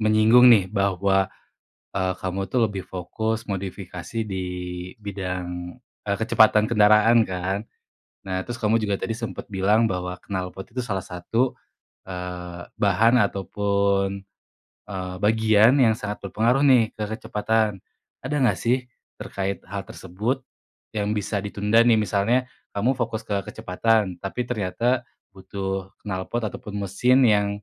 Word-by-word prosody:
menyinggung 110 Hz, +3 st, +6 dB
nih, 100 Hz, -4 st, +5 dB
bahwa, 100 Hz, -1 st, +2 dB, 0.7 s
eee, 95 Hz, -1 st, +1 dB
kamu 95 Hz, +1 st, -2 dB
tuh 115 Hz, +3 st, +1 dB
lebih 95 Hz, -2 st, -5 dB
fokus 110 Hz, +5 st, -3 dB
modifikasi 95 Hz, +1 st, -5 dB
di, 95 Hz, -1 st, -3 dB, 0.5 s
bidang 90 Hz, -3 st, -5 dB, 0.3 s
eee, 100 Hz, -1 st, 0 dB
kecepatan 110 Hz, -1 st, +4 dB
kendaraan 110 Hz, +1 st, +5 dB
kan. 95 Hz, +3 st, -3 dB, 0.6 s
Nah 95 Hz, -1 st, -2 dB
terus 120 Hz, -1 st, -5 dB
kamu 110 Hz, +1 st, +2 dB
juga 100 Hz, -2 st, 0 dB
tadi 115 Hz, -, -3 dB
sempat 115 Hz, -1 st, -5 dB
bilang 105 Hz, +4 st, +3 dB
bahwa 90 Hz, -3 st, -2 dB
knalpot 95 Hz, -1 st, -4 dB
itu 125 Hz, -, -2 dB
salah 100 Hz, -6 st, -3 dB
satu, 115 Hz, +8 st, -1 dB, 0.5 s
eee, 90 Hz, -1 st, -7 dB
bahan 110 Hz, +5 st, +4 dB
ataupun, 100 Hz, 0 st, 0 dB, 0.6 s
eee, 95 Hz, -2 st, -5 dB
bagian 110 Hz, +3 st, +4 dB
yang 110 Hz, -2 st, +3 dB
sangat 105 Hz, -1 st, -5 dB
berpengaruh 120 Hz, +6 st, +2 dB
nih, 125 Hz, -6 st, +4 dB
ke 105 Hz, -1 st, -4 dB
kecepatan. 110 Hz, -3 st, -1 dB, 0.4 s
Ada 135 Hz, +4 st, -3 dB
nggak 130 Hz, -3 st, +2 dB
sih, 125 Hz, +2 st, 0 dB, 0.3 s
terkait 100 Hz, -1 st, -3 dB
hal 100 Hz, +2 st, -5 dB
tersebut, 110 Hz, +10 st, -4 dB, 0.5 s
yang 105 Hz, -1 st, -1 dB
bisa 105 Hz, -1 st, -1 dB
ditunda 105 Hz, +3 st, +2 dB
nih 115 Hz, -2 st, +4 dB
misalnya, 110 Hz, +5 st, +1 dB, 0.2 s
kamu 120 Hz, +7 st, +1 dB
fokus 115 Hz, -3 st, -3 dB
ke 100 Hz, -, -2 dB, 0.2 s
kecepatan, 105 Hz, +1 st, +1 dB
tapi 120 Hz, +5 st, -3 dB
ternyata 120 Hz, +3 st, 0 dB, 0.3 s
butuh 95 Hz, 0 st, -5 dB, 0.2 s
knalpot 95 Hz, +4 st, -3 dB
ataupun 105 Hz, 0 st, -7 dB
mesin 125 Hz, +7 st, +3 dB
yang, 105 Hz, -2 st, +3 dB
100 Hz, 130 wpm, -24 LUFS, 95-115 Hz, 0.7 s, menyinggung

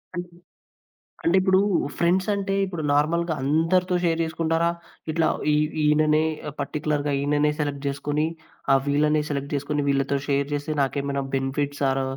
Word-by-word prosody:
అన్ 175 Hz, -, -1 dB
అంటే 175 Hz, -1 st, -21 dB, 0.9 s
అంటే 175 Hz, +3 st, +4 dB
ఇప్పుడు 190 Hz, 0 st, +4 dB, 0.4 s
ఫ్రెండ్స్ 185 Hz, +3 st, +2 dB
అంటే 195 Hz, -1 st, -2 dB
ఇప్పుడు 175 Hz, -5 st, -5 dB
నార్మల్‌గా 160 Hz, +3 st, +1 dB
అందరితో 165 Hz, +6 st, +2 dB
షేర్ 165 Hz, -1 st, +1 dB
జేసుకుంటారా? 165 Hz, +1 st, 0 dB, 0.4 s
ఇట్లా 160 Hz, 0 st, +2 dB, 0.3 s
ఇ -, -, +4 dB, 0.3 s
ఈయననే 150 Hz, +1 st, +4 dB, 0.3 s
ఆహ్, -, -, -10 dB
పార్టిక్యులర్‌గా 150 Hz, -1 st, -1 dB
ఈయననే 145 Hz, +1 st, +2 dB
సెలెక్ట్ 145 Hz, -1 st, -2 dB
జేసుకొని 145 Hz, +2 st, -1 dB, 0.5 s
ఆహ్ 135 Hz, -, +4 dB
వీళ్ళనే 150 Hz, +1 st, +2 dB
సెలెక్ట్ 140 Hz, 0 st, -3 dB
జేసుకొని 145 Hz, +1 st, -1 dB
వీళ్ళతో 140 Hz, 0 st, +1 dB
షేర్ 140 Hz, 0 st, +1 dB
జేస్తే 145 Hz, +1 st, -2 dB
నాకేమైనా 140 Hz, +1 st, -1 dB
బెనిఫిట్స్ 140 Hz, +2 st, -2 dB
ఆర్ 135 Hz, 0 st, 0 dB
150 Hz, 145 wpm, -24 LUFS, 140-165 Hz, 0.9 s, అంటే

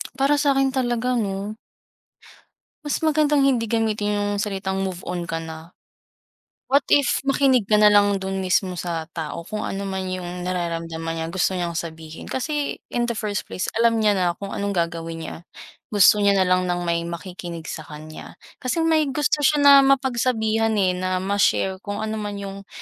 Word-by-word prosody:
Para 275 Hz, +2 st, +2 dB
sakin 270 Hz, -2 st, +2 dB
talaga 250 Hz, -1 st, 0 dB
'no. 200 Hz, 0 st, -3 dB, 1.3 s
Mas 295 Hz, -, -1 dB
magandang 300 Hz, -2 st, +3 dB
hindi 245 Hz, -4 st, +2 dB
gamitin 210 Hz, -2 st, 0 dB
yung 200 Hz, -, -1 dB
salitang 195 Hz, -2 st, -2 dB
"Move 185 Hz, -2 st, -4 dB
on 180 Hz, -1 st, -3 dB
ka 165 Hz, 0 st, -2 dB
na". 160 Hz, +1 st, -9 dB, 0.9 s
What 280 Hz, +2 st, +3 dB
if, 285 Hz, -3 st, +3 dB
makinig 270 Hz, -5 st, +2 dB
ka 210 Hz, -, +5 dB
nalang 205 Hz, -1 st, +5 dB
dun 190 Hz, 0 st, -3 dB
mismo 185 Hz, 0 st, +1 dB
sa 170 Hz, -2 st, -4 dB
tao 165 Hz, 0 st, -5 dB
kung 215 Hz, +2 st, -4 dB
ano 200 Hz, +1 st, -4 dB
man 190 Hz, -1 st, -3 dB
yung 180 Hz, -1 st, -5 dB
nararamdaman 165 Hz, -2 st, -3 dB
niya 165 Hz, 0 st, -3 dB
gusto 190 Hz, +2 st, 0 dB
niyang 175 Hz, -2 st, -2 dB
sabihin 160 Hz, -1 st, -7 dB
kasi 290 Hz, +2 st, -3 dB
in 240 Hz, 0 st, 0 dB
the 235 Hz, -, -1 dB
first 210 Hz, -2 st, -3 dB
place 185 Hz, -, -3 dB
alam 230 Hz, -1 st, +3 dB
niya 210 Hz, -2 st, +3 dB
na 185 Hz, -, +1 dB, 0.2 s
kung 200 Hz, -, -5 dB
anong 200 Hz, 0 st, -2 dB
gagawin 165 Hz, -2 st, -2 dB
niya. -, -, -6 dB, 0.6 s
Gusto 205 Hz, +1 st, +6 dB
niya 200 Hz, -1 st, +4 dB
na 195 Hz, -, +3 dB
lang 185 Hz, 0 st, +2 dB
ng 175 Hz, 0 st, -1 dB
may 170 Hz, -1 st, -1 dB
makikinig 170 Hz, -1 st, -7 dB
sa 155 Hz, -, -7 dB
kanya, 155 Hz, +1 st, -10 dB, 0.2 s
kasi 290 Hz, +6 st, -1 dB
may 320 Hz, -2 st, +3 dB
gusto 295 Hz, +2 st, 0 dB
siya 295 Hz, 0 st, +3 dB
na 280 Hz, -, +9 dB
mapagsabihan, 240 Hz, -5 st, +2 dB
eh, 190 Hz, -3 st, +3 dB
na 185 Hz, 0 st, -2 dB
ma-share 195 Hz, -1 st, +1 dB
kung 205 Hz, +1 st, -5 dB
ano 220 Hz, 0 st, -3 dB
man 205 Hz, -1 st, -4 dB
yung 200 Hz, 0 st, -7 dB
200 Hz, 175 wpm, -23 LUFS, 180-240 Hz, 1.3 s, na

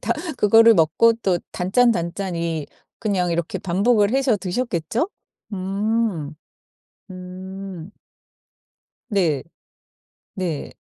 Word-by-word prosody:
다 230 Hz, -, 0 dB, 0.2 s
그거를 225 Hz, +1 st, +6 dB
먹고 170 Hz, +8 st, +4 dB
또 180 Hz, -3 st, +2 dB
단짠단짠이 175 Hz, -, 0 dB, 0.3 s
그냥 190 Hz, -5 st, 0 dB
이렇게 170 Hz, 0 st, -2 dB
반복을 205 Hz, +3 st, +2 dB
해서 265 Hz, -4 st, +2 dB
드셨겠죠? 200 Hz, -, -2 dB, 0.4 s
음. 195 Hz, -4 st, -1 dB, 0.8 s
음. 185 Hz, 0 st, -8 dB, 1.2 s
네. 170 Hz, -, +1 dB, 0.9 s
네. 175 Hz, -6 st, -3 dB
190 Hz, 165 characters per minute, -22 LUFS, 170-220 Hz, 1.2 s, 그거를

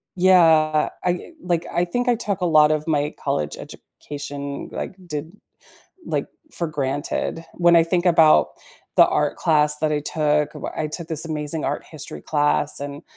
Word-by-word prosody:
Yeah. 160 Hz, -4 st, +4 dB
I 180 Hz, -, -2 dB
like, 170 Hz, -2 st, -1 dB
I 175 Hz, +1 st, +1 dB
think 245 Hz, +8 st, -2 dB
I 245 Hz, -, +4 dB
took 205 Hz, -4 st, -3 dB
a -, -, +1 dB
lot 155 Hz, -2 st, +5 dB
of 155 Hz, 0 st, -1 dB
my 150 Hz, -1 st, 0 dB
college 75 Hz, -, -2 dB
education, 140 Hz, -1 st, -8 dB
like, -, -, -5 dB
did, 150 Hz, 0 st, -5 dB, 0.8 s
like, -, -, -1 dB, 0.3 s
for 170 Hz, -, -3 dB
granted. 145 Hz, +2 st, -3 dB
When 175 Hz, -1 st, +4 dB
I 165 Hz, -, +7 dB
think 175 Hz, +1 st, 0 dB
about 165 Hz, -3 st, +5 dB, 0.5 s
the -, -, +8 dB
art -, -, 0 dB
class 150 Hz, -2 st, +2 dB
that 155 Hz, 0 st, 0 dB
I 150 Hz, -, 0 dB
took, 150 Hz, 0 st, 0 dB
wh -, -, -7 dB
I 155 Hz, -, 0 dB
took 160 Hz, +2 st, -7 dB
this 160 Hz, 0 st, -3 dB
amazing 155 Hz, -1 st, -3 dB
art -, -, -2 dB
history 75 Hz, -, -9 dB
class, 145 Hz, -1 st, +1 dB
and 145 Hz, +2 st, -6 dB
155 Hz, 170 wpm, -22 LUFS, 150-170 Hz, 0.8 s, the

